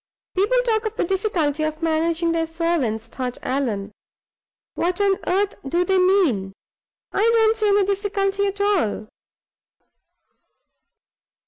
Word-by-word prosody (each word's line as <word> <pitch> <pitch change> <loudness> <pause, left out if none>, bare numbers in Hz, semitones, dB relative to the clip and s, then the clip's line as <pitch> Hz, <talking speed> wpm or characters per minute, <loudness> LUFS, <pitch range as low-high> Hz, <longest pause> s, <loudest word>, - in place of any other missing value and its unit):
"People 410 +7 +2
talk 440 -2 +1
of 435 - -6
the - - 0
difficulty 345 -6 0
of 310 +1 -3
managing 330 +1 +1
their 330 -1 0
servants," 325 -10 -1
thought 250 +1 -5
Allan. 225 -7 -2 0.8
"What 355 +3 -1
on 395 -1 +2
earth 395 +2 +1
do 345 +6 0
they 380 0 +2
mean? 335 - +2 0.6
I - - -1
don't 450 0 +4
see 430 -1 0
any 405 0 +4
difficulty 400 0 0
at 400 +1 -4
all." 345 - 0
360 Hz, 125 wpm, -22 LUFS, 305-405 Hz, 0.8 s, don't